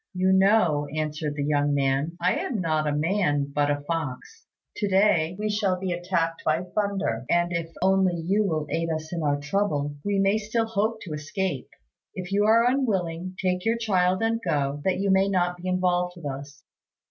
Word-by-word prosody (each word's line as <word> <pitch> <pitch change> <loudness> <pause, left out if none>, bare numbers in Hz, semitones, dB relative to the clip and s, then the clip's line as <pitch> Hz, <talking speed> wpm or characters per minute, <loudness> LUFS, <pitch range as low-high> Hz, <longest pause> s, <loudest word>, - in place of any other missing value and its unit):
"You 185 +1 +3
know," 190 -7 +3
answered 155 -1 -2
the 145 - -2
young 145 0 +1
man, 140 +4 0
"I - - +1
am 235 -6 -2
not 155 -3 0
a - - +1
man 150 -2 0
but 145 0 +1
a 145 0 0
fox. 165 - -5 0.3
To 205 - 0
day 190 -4 +3
we 210 +1 -2
shall 205 -3 0
be 185 -1 -2
attacked 170 -1 -1
by 160 +3 +1
thunder; 195 - -2
and 175 0 +2
if 170 -1 -2
only 190 -1 +3
you 185 +6 +1
will 160 -6 -1
aid 165 0 -1
us 155 +1 -4
in 170 - -2
our 145 -2 +1
trouble, 145 -3 -1
we 205 -1 0
may 195 +2 +3
still 220 +2 -1
hope 220 0 -1
to 165 - -7
escape. 150 - -3 0.5
If 180 0 -6
you 205 +1 +2
are 230 +2 +5
unwilling, 185 -9 -1
take 180 -1 0
your 225 +1 +1
child 185 -3 +1
and 225 0 0
go, 145 -4 -1
that 190 - +2
you 195 +1 +1
may 190 +1 +3
not 180 -2 +1
be 180 +1 -7
involved 180 -1 +1
with 170 - -10
us." 140 +1 -7
180 Hz, 195 wpm, -25 LUFS, 150-195 Hz, 0.5 s, are